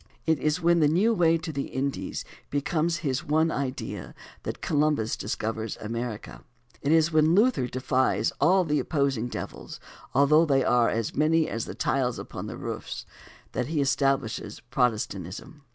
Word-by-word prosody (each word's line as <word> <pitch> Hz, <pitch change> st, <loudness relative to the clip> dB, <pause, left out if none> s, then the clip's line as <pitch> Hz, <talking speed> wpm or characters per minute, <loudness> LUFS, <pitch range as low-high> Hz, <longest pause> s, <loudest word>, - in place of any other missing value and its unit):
It 160 Hz, -2 st, +2 dB
is 150 Hz, +2 st, +1 dB
when 170 Hz, 0 st, +3 dB
the 150 Hz, -, +5 dB
new 190 Hz, +10 st, +3 dB
way 165 Hz, -4 st, +4 dB
to 165 Hz, 0 st, -5 dB
the 140 Hz, -2 st, -3 dB
Indies 135 Hz, +1 st, -3 dB, 0.2 s
becomes 155 Hz, +4 st, 0 dB
his 135 Hz, +2 st, 0 dB
one 160 Hz, +1 st, +2 dB
idea 135 Hz, -3 st, -4 dB, 0.3 s
that -, -, -5 dB
Columbus 145 Hz, -7 st, +1 dB
discovers 110 Hz, +1 st, -3 dB
America. 115 Hz, 0 st, -5 dB, 0.4 s
It 140 Hz, -, 0 dB
is 165 Hz, 0 st, +4 dB
when 155 Hz, +2 st, +4 dB
Luther 210 Hz, -, +3 dB
defies 130 Hz, +1 st, +1 dB
all 185 Hz, +5 st, +5 dB
the 150 Hz, -3 st, +1 dB
opposing 140 Hz, -6 st, 0 dB
devils, -, -, -7 dB, 0.4 s
although 150 Hz, +4 st, +6 dB
they 135 Hz, -2 st, +3 dB
are 120 Hz, -2 st, +3 dB
as 115 Hz, -1 st, -2 dB
many 155 Hz, +2 st, +3 dB
as 115 Hz, -, -3 dB
the -, -, -7 dB
tiles 125 Hz, -3 st, 0 dB
upon -, -, -7 dB
the -, -, -6 dB
roofs, -, -, -5 dB, 0.5 s
that -, -, -2 dB
he 155 Hz, 0 st, -1 dB
establishes 135 Hz, -6 st, 0 dB
Protestantism. 110 Hz, -, -2 dB
140 Hz, 155 wpm, -27 LUFS, 125-160 Hz, 0.5 s, although